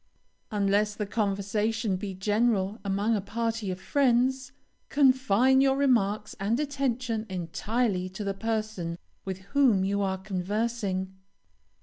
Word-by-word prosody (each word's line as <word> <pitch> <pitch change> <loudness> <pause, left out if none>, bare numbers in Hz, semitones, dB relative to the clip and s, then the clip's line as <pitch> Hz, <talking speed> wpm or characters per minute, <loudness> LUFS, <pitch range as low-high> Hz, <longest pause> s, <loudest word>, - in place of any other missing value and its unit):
Unless 205 0 +1
the 210 - -2
conversation 210 +1 0
be 195 0 -5
general 210 +1 +1
among 200 +3 +1
a 205 - -1
party 225 0 -2
of 185 0 -4
friends, 260 +1 +1 0.4
confine 260 -2 +4
your 270 0 +3
remarks 215 -6 +1
and 215 +6 0
attention 255 -6 -1
entirely 185 +2 -1
to 190 +3 -6
the 200 -1 -1
person 215 -5 -3 0.3
with 190 -1 -4
whom 255 -9 +4
you 200 +1 0
are 190 -1 0
conversing. 190 0 -2
210 Hz, 120 wpm, -28 LUFS, 195-240 Hz, 0.4 s, confine